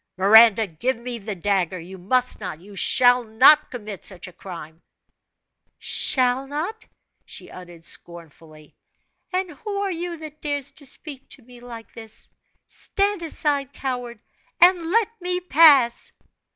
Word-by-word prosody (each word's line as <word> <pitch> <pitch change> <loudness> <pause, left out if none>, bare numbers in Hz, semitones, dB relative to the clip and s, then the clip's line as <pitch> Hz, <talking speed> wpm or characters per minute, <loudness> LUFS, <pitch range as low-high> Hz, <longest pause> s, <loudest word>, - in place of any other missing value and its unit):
"Miranda, 220 +3 +6
give 205 +9 -3
me 240 0 -6
the 210 0 -6
dagger. 185 -1 -1
You 185 +3 -11
must 250 +7 0
not, 185 -6 -6
you 200 +3 -14
shall 245 +4 +4
not, 255 +7 +5
commit 210 -6 -8
such 190 -1 -3
a 180 - -13
crime!" 165 -3 -10 1.0
"Shall 255 +1 +1
not?" 330 +11 -5 0.4
she - - -9
uttered 175 -2 -12
scornfully. 160 -3 -7 0.6
"And 370 -1 -2
who 400 +7 -6
are 400 -1 -1
you 345 0 -5
that 310 -1 -11
dares 285 -3 -2
to 285 - -8
speak 275 0 -6
to 260 - -10
me 245 +1 -15
like 235 -2 -11
this? 225 -1 -8 0.3
Stand 400 -1 -2
aside, 290 -4 -1
coward, 245 -3 -5 0.4
and 350 -2 +5
let 450 +3 +2
me 360 0 -1
pass!" 290 -8 +5
245 Hz, 140 wpm, -22 LUFS, 195-305 Hz, 1.0 s, Miranda